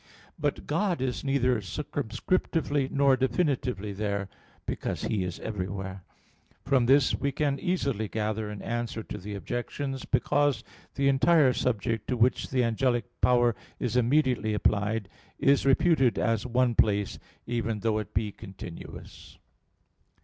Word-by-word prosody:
But - - -1
God 195 -5 0
is 130 -1 -2
neither 130 -4 +2
circumscriptively 145 - -1
nor 140 -1 +4
definitively 130 - 0
there, 100 -1 -2 0.4
because - - -3
He 100 -4 0
is 90 -1 -5
everywhere. 95 -2 -4 0.6
From 130 -3 +3
this 135 +1 +5
we 140 - 0
can 140 0 0
easily 140 - -1
gather 110 +1 -2
an 105 -1 -7
answer 115 -1 -3
to 105 - -7
the 100 +2 -6
objections: 135 +6 -4
because 145 +2 +1 0.3
the 140 0 +1
entire 140 0 +5
subject 115 -3 -1
to 125 - -1
which 120 +3 +2
the 130 -1 +2
angelic 120 +1 +1 0.2
power 120 -1 +4 0.3
is 125 -1 -2
immediately 125 -3 +2
applied, 105 +1 0 0.3
is 140 0 +3
reputed 135 -3 +4
as 115 0 0
one 125 0 +2
place, 105 -3 +1 0.3
even 115 -3 -2
though 110 -1 +1
it 105 -1 -6
be 105 0 0
continuous. 95 -5 -10
120 Hz, 135 wpm, -28 LUFS, 105-135 Hz, 0.6 s, this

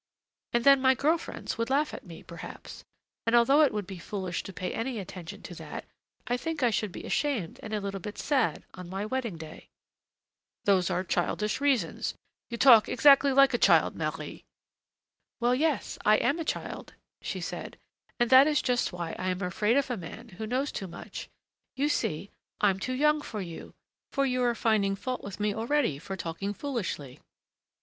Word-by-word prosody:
And 235 0 +1
then 275 0 +7
my 260 0 +5
girl 310 +6 +2
friends 325 - -6
would 230 - 0
laugh 290 +3 +1
at - - -7
me, 165 -2 -10
perhaps, 170 -1 -10 0.4
and 230 - +4
although 270 +6 +6
it 295 - +5
would 210 -2 -3
be 190 -1 -8
foolish 185 0 -4
to - - -8
pay 180 0 -4
any 235 +1 -3
attention 180 -4 -8
to - - -8
that, - - -7 0.4
I 245 - 0
think 320 +1 -3
I 240 - +4
should 210 -2 -1
be - - -8
ashamed 255 - -1
and 215 - -7
a 215 - 0
little 200 -1 -4
bit 210 +3 -7
sad 275 -5 +1
on 180 -1 -9
my 195 +2 -3
wedding 230 -5 -3
day." 160 -1 -10 1.0
"Those 190 -3 +3
are 185 - 0
childish 210 +5 -1
reasons; 265 -12 0 0.3
you 235 - -4
talk 235 -4 +7
exactly 280 +2 +6
like 275 0 +5
a 240 - +1
child, - - +4
Marie!" - - -4 1.0
"Well, 240 +1 +3
yes, 290 -2 0
I 215 - +6
am 295 +4 +1
a - - -1
child," - - -4 0.3
she - - -4
said, - - -6 0.4
"and 240 0 +2
that 260 +2 +9
is 300 -2 +3
just 250 -1 0
why 170 -2 -4
I 185 - -1
am 185 +2 -2
afraid 210 +7 +1
of 275 -2 +1
a 245 - -1
man 205 +7 -9
who 215 +3 -6
knows 260 +5 -1
too 195 - -5
much. 170 - -8 0.5
You 285 +3 +1
see, 185 - -1 0.3
I'm 195 -2 +3
too 255 +6 -3
young 300 +2 +3
for 220 -7 -6
you, 170 -4 -8 0.4
for 275 -1 +1
you 255 -1 0
are 240 -1 +2
finding 210 -4 +2
fault 255 +5 -4
with 200 0 -7
me 210 0 +1
already 230 - 0
for 190 +3 -6
talking 190 +4 -4
foolishly! 190 - -4
225 Hz, 190 wpm, -29 LUFS, 190-265 Hz, 1.0 s, that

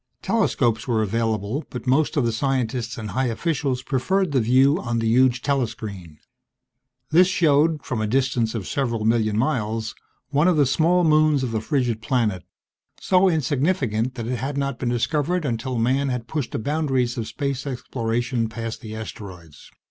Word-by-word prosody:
Telescopes 125 - +1
were 110 -3 +1
available 110 +4 -1
but 125 - -7
most 145 +5 +2
of 135 - +2
the 115 - +1
scientists 125 0 -1
and 110 -3 -5
high 130 +6 0
officials 135 0 -1
preferred 175 +7 0
the 135 - +2
view 130 +6 +4
on 120 -2 -2
the 115 -1 0
huge 125 +1 +3
telescreen. 105 - -3 0.9
This 175 +3 +6
showed, 155 -3 +2
from 120 -4 -2
a 110 - 0
distance 120 -1 0
of 105 -4 -3
several 115 -6 -1
million 110 -2 +2
miles, 115 -3 -1 0.4
one 150 +4 +2
of 180 -3 +3
the 145 - +5
small 170 +6 +2
moons 155 -3 +3
of 125 - -2
the 110 -1 -1
frigid 125 -4 -1
planet, 110 -6 0 0.6
so 185 0 +3
insignificant 135 - 0
that 115 -3 -5
it 125 +1 -2
had 135 +4 -3
not 140 -3 -2
been 125 - -1
discovered 145 +8 0
until 120 0 -2
man 130 +4 +1
had 125 -2 -3
pushed 145 -2 -3
the - - -1
boundaries 135 -2 0
of 115 -3 -4
space 140 +4 -3
exploration 120 -2 -2
past 115 0 -6
the 110 -2 -7
asteroids. 90 -8 -9
125 Hz, 170 wpm, -23 LUFS, 115-140 Hz, 0.9 s, This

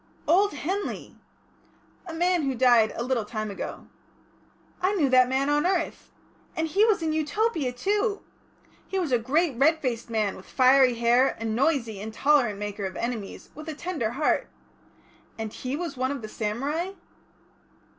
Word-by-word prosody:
"Old 380 +5 +4
Henley!" 370 +8 -4 0.9
"A - - -5
man 350 +1 +2
who 270 -3 -1
died 240 -3 +5
a 235 - -2
little 250 -2 0
time 215 0 -4
ago." 195 - -6 1.0
"I 375 +3 +2
knew 300 -8 +2
that 255 -1 +5
man 265 +1 +1
on 295 0 +2
earth. 365 -3 -2 0.4
And 320 0 0
he 390 +7 +3
was 420 -7 +2
in 315 -1 0
Utopia, 315 - 0
too! 405 - -1 0.6
He 385 - -3
was 345 -7 -1
a 245 - +3
great 290 +5 +1
red 315 +3 +4
faced 240 -5 -3
man, 215 -3 0
with 190 - -13
fiery 260 -1 +5
hair, 240 +3 +3
a 225 - -4
noisy, 230 -2 0
intolerant 220 +1 +2
maker 205 0 -4
of 190 - -5
enemies, 230 -4 -5
with 310 +2 -9
a 310 - -5
tender 305 -9 -2
heart 295 +4 +1 0.9
and 220 -1 -5
he 255 +2 -4
was 335 0 -4
one 260 +1 0
of 275 -4 -4
the - - -4
samurai?" 275 - -3
270 Hz, 165 wpm, -26 LUFS, 230-325 Hz, 1.0 s, died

